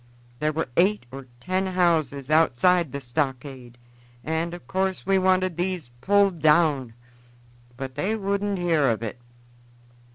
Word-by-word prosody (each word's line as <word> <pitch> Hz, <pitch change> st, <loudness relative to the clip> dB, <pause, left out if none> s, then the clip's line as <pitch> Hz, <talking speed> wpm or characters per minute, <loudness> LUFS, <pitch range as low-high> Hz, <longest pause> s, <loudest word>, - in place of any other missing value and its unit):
There 150 Hz, 0 st, +1 dB
were 160 Hz, +2 st, -2 dB
eight 195 Hz, -2 st, +2 dB
or 135 Hz, 0 st, -9 dB
ten 185 Hz, +6 st, -1 dB
houses 160 Hz, -7 st, 0 dB
outside 165 Hz, +1 st, +3 dB
the 140 Hz, -, -4 dB
stockade, 130 Hz, -2 st, -4 dB, 0.5 s
and 160 Hz, +2 st, -2 dB
in 175 Hz, -, -7 dB
course 190 Hz, 0 st, -2 dB
we 195 Hz, 0 st, +3 dB
wanted 185 Hz, -2 st, +1 dB
these 175 Hz, -7 st, -3 dB
pulled 200 Hz, 0 st, +3 dB
down; 150 Hz, -6 st, +2 dB, 0.8 s
but 135 Hz, -1 st, -6 dB
they 205 Hz, +9 st, -1 dB
wouldn't 200 Hz, -1 st, -1 dB
hear 165 Hz, -6 st, +2 dB
of 115 Hz, -1 st, -1 dB
it. 115 Hz, +2 st, -6 dB
165 Hz, 135 wpm, -24 LUFS, 135-185 Hz, 0.8 s, outside